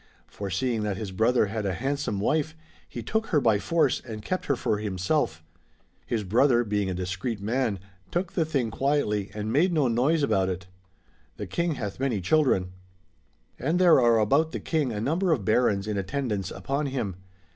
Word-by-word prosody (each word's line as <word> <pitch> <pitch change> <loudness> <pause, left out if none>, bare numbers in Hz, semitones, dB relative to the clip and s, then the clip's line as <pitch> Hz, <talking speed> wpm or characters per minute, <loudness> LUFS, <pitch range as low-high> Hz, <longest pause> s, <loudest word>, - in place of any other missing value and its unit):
For 100 -1 -6
seeing 115 +4 -1
that 105 -2 -2
his 105 -2 -5
brother 115 +5 +3
had 105 +1 -3
a 95 -3 -1
handsome 135 -4 -2
wife, 155 +8 0 0.3
he 120 - -6
took 220 - -1
her 155 - +3
by 110 -6 +3
force 165 +8 +1
and 110 -3 -7
kept 185 - -3
her 140 - +2
for 105 -3 -1
himself 95 - -1 0.6
His 115 -3 -1
brother, 120 +5 +3
being 105 -3 -1
a 90 - -2
discreet 95 +5 -3
man, 110 0 0 0.3
took 175 0 -2
the 170 - +2
thing 135 -8 -1
quietly 110 -6 0
and 105 +1 -3
made 175 +6 +3
no 155 -6 +2
noise 135 +7 +2
about 95 -8 +2
it. 90 0 -4 0.7
The - - -4
King 170 -2 -1
hath 105 -4 -5
many 130 -6 0
cliildren. 95 - +2 0.9
And 155 +7 0
there 175 -5 +6
are 120 -2 +4
about 140 +9 +2
the - - -2
King 150 -6 -1
a 105 - -3
number 165 - +1
of 125 -11 0
Barons 110 -3 +2
in 105 -2 -2
attendance 105 -2 -2
upon 135 +9 -2
him. 115 -9 -3
120 Hz, 185 wpm, -26 LUFS, 100-145 Hz, 0.9 s, there